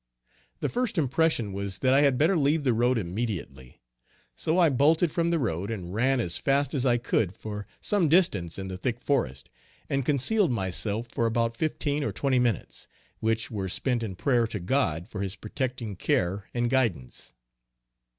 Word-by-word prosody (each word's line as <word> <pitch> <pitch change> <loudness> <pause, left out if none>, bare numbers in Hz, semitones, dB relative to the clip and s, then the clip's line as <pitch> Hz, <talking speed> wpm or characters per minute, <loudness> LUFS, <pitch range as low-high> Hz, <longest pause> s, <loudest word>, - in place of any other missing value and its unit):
The - - +1
first 245 -5 -1
impression 140 -7 +1
was 100 -1 -3
that 130 0 +2
I 140 - +5
had 140 -3 +3
better 160 +7 +3
leave 150 0 +2
the 130 -3 +2
road 120 +2 +2
immediately; 90 - -5 0.5
so 160 - 0
I 170 -3 +5
bolted 155 +5 +3
from 170 +1 0
the 170 - +2
road 100 - -2
and 95 -5 -5
ran 130 +5 +2
as 90 -7 -1
fast 140 +2 +1
as 135 -2 +1
I 120 -1 +4
could 105 -5 -1
for 105 -1 -6
some 190 -7 +2
distance 105 - +2
in 95 -1 -5
the 95 -1 -5
thick 120 +5 -2
forest, 65 - -1 0.4
and 135 0 +1
concealed 150 - +2
myself 105 +2 -1
for 115 - 0
about 115 0 0
fifteen 150 +1 -1
or - - -1
twenty 135 -3 +1
minutes, 120 -6 -2 0.3
which 110 +1 -1
were 95 -4 -3
spent 125 +5 -1
in 105 -5 -4
prayer 120 +2 +2
to 110 -2 -4
God 90 - 0
for 105 -4 -6
his 95 0 -3
protecting 120 0 -4
care 95 +2 -1
and 120 0 0
guidance. 110 - -1
120 Hz, 180 wpm, -27 LUFS, 100-140 Hz, 0.5 s, I